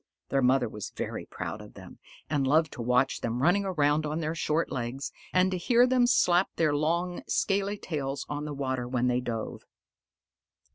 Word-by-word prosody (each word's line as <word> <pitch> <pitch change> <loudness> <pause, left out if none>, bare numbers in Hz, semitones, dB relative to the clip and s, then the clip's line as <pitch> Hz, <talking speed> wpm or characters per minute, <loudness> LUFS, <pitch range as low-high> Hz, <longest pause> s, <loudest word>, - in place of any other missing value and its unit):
Their 135 - +2
mother 130 0 +3
was 105 -1 -6
very - - -5
proud - - -5
of - - -13
them, - - -12 0.3
and 140 -3 0
loved 155 +2 +3
to - - -7
watch 125 +3 +2
them 115 +1 -2
running 195 +5 +3
around 150 -4 +2
on 155 +1 -2
their 160 0 -2
short 160 0 0
legs, 130 +2 -3 0.2
and 185 +1 +3
to 185 - -1
hear 240 +7 +4
them 250 -1 +3
slap 180 -6 +4
their 155 -3 +2
long, 170 +4 0
scaly 200 +1 0
tails 140 -7 -4
on 145 0 -4
the 150 - -4
water 130 -3 -2
when 125 0 0
they 125 0 +2
dove. 115 -3 -4
150 Hz, 185 wpm, -28 LUFS, 130-175 Hz, 0.3 s, hear